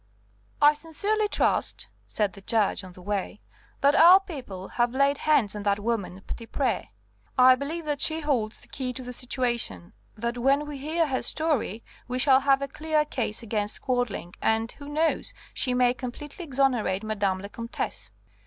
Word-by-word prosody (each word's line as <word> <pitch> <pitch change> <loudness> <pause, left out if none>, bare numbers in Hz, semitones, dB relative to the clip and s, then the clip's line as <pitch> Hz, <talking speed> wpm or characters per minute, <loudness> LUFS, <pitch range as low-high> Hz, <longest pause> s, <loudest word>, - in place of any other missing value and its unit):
"I 295 +1 +8
sincerely 400 +8 0
trust," - - 0 0.2
said 205 -3 0
the 195 - -12
Judge 210 -1 +1
on 185 -1 -11
the 180 - -13
way, 205 +1 -3 0.4
"that 280 +1 +5
our 345 +5 +8
people 250 - -8
have 240 +1 0
laid 275 +1 +3
hands 255 -10 +3
on 210 - -4
that 200 0 +1
woman 205 -4 -3
Petitpré. 230 -1 -2 0.5
I 255 0 +8
believe 305 +5 -4
that 295 -2 -2
she 315 0 +2
holds 245 -8 -1
the - - -15
key 255 -2 -3
to 260 - -7
the 250 0 -7
situation, 240 - -1 0.2
that 235 +2 -3
when 275 +4 +3
we 295 -2 -7
hear 320 +4 0
her 265 -4 -1
story 290 - -1 0.2
we 250 0 -2
shall 265 0 +5
have 275 0 +3
a - - -2
clear 305 +2 0
case 235 -6 -2
against 210 -2 -2
Quadling; 245 -9 -1
and 225 +1 +1
who 285 0 -10
knows? 315 +2 0 0.2
she 250 -1 +1
may 250 -1 +4
completely 280 +7 -7
exonerate 255 -8 +1
Madame 205 -3 0
la 195 +2 -7
Comtesse." 205 - -5
250 Hz, 170 wpm, -26 LUFS, 215-290 Hz, 0.5 s, I